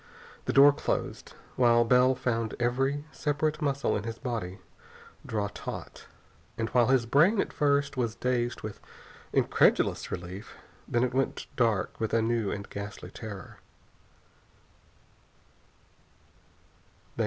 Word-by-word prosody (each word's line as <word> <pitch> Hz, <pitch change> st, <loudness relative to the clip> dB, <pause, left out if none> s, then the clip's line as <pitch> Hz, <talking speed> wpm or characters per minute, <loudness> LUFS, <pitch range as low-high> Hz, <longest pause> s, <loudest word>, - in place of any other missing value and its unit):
The -, -, 0 dB
door 140 Hz, +1 st, +8 dB
closed, -, -, -3 dB, 0.2 s
while 120 Hz, -2 st, +5 dB
Bell 125 Hz, +2 st, +4 dB
found 115 Hz, -3 st, -1 dB
every 135 Hz, +4 st, 0 dB
separate 150 Hz, +1 st, -1 dB
muscle 140 Hz, -2 st, 0 dB
in -, -, -1 dB
his 115 Hz, +1 st, -5 dB
body 115 Hz, -8 st, -4 dB, 0.7 s
draw 105 Hz, -2 st, -2 dB
taut. -, -, -8 dB, 0.5 s
And 115 Hz, 0 st, -1 dB
while 120 Hz, -1 st, +3 dB
his 130 Hz, -2 st, +3 dB
brain 160 Hz, -, +4 dB
at -, -, -1 dB
first 140 Hz, -2 st, +1 dB
was 115 Hz, -3 st, -1 dB
dazed 120 Hz, -1 st, -1 dB
with 105 Hz, -1 st, -6 dB, 0.5 s
incredulous -, -, +2 dB
relief, 90 Hz, +4 st, -7 dB, 0.3 s
then 120 Hz, +1 st, +1 dB
it 125 Hz, -, 0 dB
went 135 Hz, +1 st, -1 dB
dark 110 Hz, -7 st, +1 dB
with 110 Hz, -1 st, -1 dB
a 115 Hz, -, +3 dB
new 115 Hz, -3 st, 0 dB
and 100 Hz, 0 st, -5 dB
ghastly 100 Hz, +1 st, -7 dB
terror. 105 Hz, -4 st, -9 dB
120 Hz, 120 wpm, -28 LUFS, 110-135 Hz, 0.7 s, door